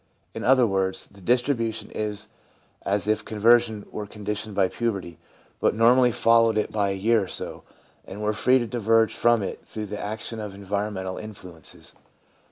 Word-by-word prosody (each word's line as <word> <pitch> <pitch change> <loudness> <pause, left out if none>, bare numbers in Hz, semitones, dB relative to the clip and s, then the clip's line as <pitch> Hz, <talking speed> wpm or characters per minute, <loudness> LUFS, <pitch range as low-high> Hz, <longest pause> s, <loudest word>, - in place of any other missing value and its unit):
In - - -6
other 130 -1 +5
words, 95 -2 -1
the 100 - -18
distribution 120 0 0
is 105 -1 -3 0.6
much - - -3
as 100 0 +1
if 110 0 +1
conversion 110 0 +3
were 105 -1 -5
conditioned 105 0 -5
by 95 -2 +3
puberty, 95 -6 -3 0.4
but - - +2
normally 120 +2 +5
followed 115 -1 +4
it 105 - 0
by 100 -2 0
a 95 - -1
year 110 +3 +2
or - - -11
so, - - -6 0.5
and 100 - -8
were 105 0 +1
free 130 +4 +3
to 120 - -1
diverge 115 -1 +2
from 120 -3 +3
it 95 - -6
through 110 -1 -6
the 105 0 -6
action 110 +2 -5
of 105 -2 -6
environ 100 +1 -3
mental 95 0 -4
influences. 90 -6 -11
105 Hz, 175 wpm, -25 LUFS, 100-115 Hz, 0.6 s, other